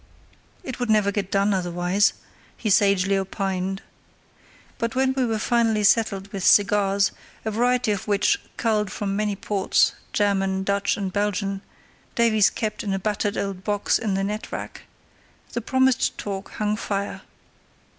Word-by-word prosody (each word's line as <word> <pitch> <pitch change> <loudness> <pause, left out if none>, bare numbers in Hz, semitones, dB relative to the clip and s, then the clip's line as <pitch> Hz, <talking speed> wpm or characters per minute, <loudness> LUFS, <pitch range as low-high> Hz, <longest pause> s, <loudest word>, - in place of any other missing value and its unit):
"It 260 -7 -6
would 245 -2 -2
never 210 -2 +3
get 200 -2 -3
done 200 +1 +2
otherwise," 180 +2 +1 0.4
he 215 - -1
sagely 195 -1 +3
opined. 195 0 -2 1.0
But 230 +1 -2
when 265 0 +2
we 260 -2 0
were 225 -1 0
finally 225 -1 +1
settled 200 -2 +2
with 195 -2 -4
cigars, 200 -1 +4 0.3
a 220 - -1
variety 245 +1 +1
of 205 - -3
which, 210 - +2 0.2
culled 215 -4 0
from 195 -1 -3
many 210 0 0
ports—German, 195 -1 0
Dutch, 200 +3 0
and 195 -3 -3
Belgian—Davies 205 +2 0
kept 215 -2 -3
in 200 -2 -1
a - - 0
battered 205 +1 -1
old 195 -2 -3
box 205 0 +1
in 210 -4 -1
the 195 - 0
net 210 +2 -4
rack, - - -7 0.7
the 240 - -2
promised 260 +2 +2
talk 195 -1 -5
hung 210 0 -1
fire. 200 -2 -3
205 Hz, 145 wpm, -24 LUFS, 195-220 Hz, 1.0 s, cigars